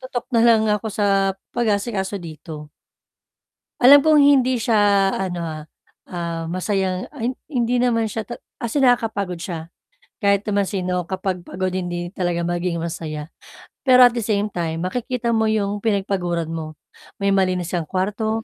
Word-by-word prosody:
tutok 255 -2 -5
nalang 230 -1 +4
ako 210 +1 -1
sa 195 -2 +1 0.2
pag-aasikaso 205 -3 -1
dito. 155 -3 -9 1.1
Alam 275 +3 +9
kong 310 -1 +5
hindi 260 -3 +4
siya 225 0 +1 0.4
ano 180 -2 -3
ha, 155 -2 -5 0.5
ah, 170 -2 -3
masayang 185 0 -1
an 240 -2 -1 0.2
hindi 245 -4 0
naman 230 -3 +1
siya 220 +1 -4
tat 240 - -8 0.2
as 235 +2 -4
in 285 - +3
nakakapagod 220 -8 +1
siya. 165 -1 -6 0.5
Kahit 200 -2 +2
naman 200 -1 +1
sino 180 -2 -2
kapag 185 -1 -3
pagod 185 0 -2
hindi 175 -1 -3
talaga 175 -2 -2
maging 175 0 -1
masaya, 155 -2 -5 0.6
pero 255 -1 +8
at 245 - +7
the 235 - -3
same 210 -1 0
time 165 -2 -3
makikita 240 +4 -2
mo 220 -1 +2
yung 205 -1 0
pinagpaguran 190 -6 -1
mo, 155 -1 -5 0.5
may 200 - +3
malinis 185 -3 +1
kang 170 -3 -2
kwarto, 210 +5 -1
195 Hz, 150 wpm, -21 LUFS, 175-225 Hz, 1.1 s, Alam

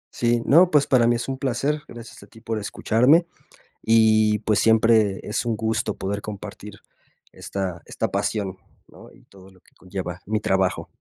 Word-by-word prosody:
Sí, 120 -1 +1
no, 170 +5 +5
pues, 150 -5 +3
para 120 -3 +3
mí 120 - +3
es 120 - -4
un 135 -1 -4
placer. 140 +3 -1
Gracias 120 -1 -12
a 100 - -15
ti 115 - -17
por 110 -1 -4
escucharme, 125 - +2 0.6
y 110 -1 +3
pues, 105 -1 0
siempre 110 -3 +3
es 105 - -2
un 115 -2 -1
gusto 110 0 -2
poder 100 +1 -4
compartir 105 0 -9 0.5
esta 95 -3 -5
esta - - -3
pasión, 100 -4 -2 0.3
¿no? - - -16
Y - - -21
todo 95 -1 -18
lo 95 -1 -22
que - - -28
conlleva 90 -1 -7
mi 110 +1 0
trabajo. 95 -3 0
110 Hz, 175 wpm, -23 LUFS, 100-120 Hz, 0.6 s, no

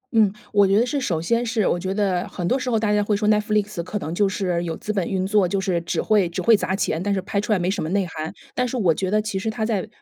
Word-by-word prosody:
嗯， 215 -4 +4 0.2
我 205 -1 +5
觉 195 +1 +3
得 230 - +4
是 280 +3 -1
首 175 -11 -1
先 230 +8 +1
是 225 -3 0
我 175 - +1
觉 185 +2 -2
得 195 -3 0
很 175 - -5
多 255 +10 +1
时 255 - -3
候 230 - +2
大 215 -1 +1
家 210 - +3
会 205 0 +1
说 210 +1 +1
Netflix 210 -2 +1
可 180 +5 -4
能 160 -3 -5
就 200 +3 +2
是 185 -3 -1
有 165 -1 -3
资 215 - -4
本 195 -4 -1
运 190 -1 -1
作， 200 -1 +3
就 195 +2 -1
是 185 -3 0
只 170 - -2
会 210 -4 +3
只 170 - -4
会 230 -2 +5
砸 190 - -1
钱， 160 -4 -1
但 200 +2 0
是 190 - 0
拍 200 +1 -2
出 210 +2 0
来 - - +3
没 180 +2 0
什 200 - -2
么 155 - -2
内 195 +1 +1
涵， 160 -2 -6 0.2
但 250 - 0
是 250 - -4
我 190 -9 +3
觉 185 +4 -2
得 215 +2 +2
其 210 -2 -3
实 220 - -2
它 220 0 -2
在 215 -5 -1
200 Hz, 370 characters per minute, -22 LUFS, 185-215 Hz, 0.2 s, 我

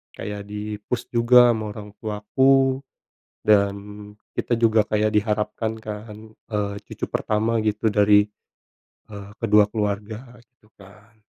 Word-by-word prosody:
kayak 105 -1 -6
di-push 105 +3 -5
juga 120 +1 +6
ama 110 -2 -3
orang 105 -1 -9
tuaku. 130 +5 +2 0.6
Dan 100 -2 +3 0.6
kita 120 - -1
juga 115 -2 +3
kayak 105 0 +1
diharapkan 105 +1 -1
kan, 105 0 -8 0.3
eee, 105 -2 -2
cucu - - -5
pertama 110 +2 -1
gitu 110 0 0
dari, 105 0 +5 0.9
eee, 100 -1 -9
kedua 105 -2 +5
keluarga 110 +3 -4
gitu 110 -3 -30
kan. 105 +3 -18
105 Hz, 115 wpm, -23 LUFS, 105-115 Hz, 0.9 s, juga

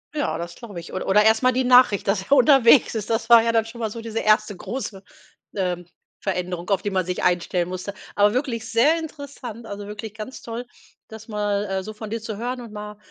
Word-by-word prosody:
Ja, 290 - -1
das 170 0 -6
glaube 205 -8 -9
ich. 170 - -11
Oder 185 - -4
oder 210 +2 +5
erst 220 +3 +4
mal 255 - +5
die 255 +1 0
Nachricht, 250 -6 +5
dass 195 -1 +1
er 200 - -18
unterwegs 260 -2 +6
ist. 215 -1 -4
Das 225 0 -1
war 235 -1 +9
ja 230 - +2
dann 225 -1 +2
schon 235 +1 -10
mal 220 -2 -1
so 230 +1 -7
diese 225 0 -4
erste 215 -2 +2
große, 205 -2 -6 0.5
ähm, 180 -2 -2 0.3
Veränderung, 180 -2 -3
auf 195 - +2
die 205 - -2
man 185 -2 0
sich 180 0 -3
einstellen 175 0 +1
musste. 185 +2 -5 0.2
Aber 205 +1 +4
wirklich 250 -4 -2
sehr 265 +9 +4
interessant, 285 -7 -8
also, 205 0 -6
wirklich 210 +1 -7
ganz 220 +5 -8
toll, 235 +1 -6 0.4
das 220 0 -11
mal, 205 -1 -1
äh, 190 0 -2
so 215 +2 -7
von 215 0 -8
dir 225 0 -3
zu 220 -2 -6
hören 245 +2 -4
und 225 -3 -10
mal, 210 0 -7
215 Hz, 230 wpm, -23 LUFS, 195-235 Hz, 0.5 s, war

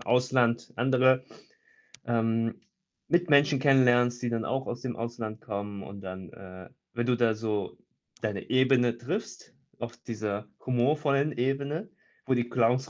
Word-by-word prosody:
Ausland 125 -1 +2
andere, 130 +1 +3 0.8
ähm, 115 -1 0 0.5
Mitmenschen 145 -5 +4
kennenlernst, 125 -3 +4
die 120 - 0
dann 115 -1 -2
auch 135 +1 -1
aus 120 - -4
dem 125 -2 -4
Ausland 115 -2 -5
kommen 100 -1 -5
und 100 0 -9
dann, 95 -2 -7
äh 95 0 -11 0.2
wenn 120 0 -1
du 125 - +3
da 115 -2 +3
so 105 -3 -3 0.4
deine 105 -3 -3
Ebene 130 -2 +3
triffst, 145 - -5 0.3
auf 120 0 -6
dieser 105 -3 -4 0.2
humorvollen 140 +3 +2
Ebene, 140 - -2 0.4
wo 130 - +2
die 120 -1 +1
Clowns 125 +4 +2
120 Hz, 135 wpm, -28 LUFS, 115-130 Hz, 0.8 s, Mitmenschen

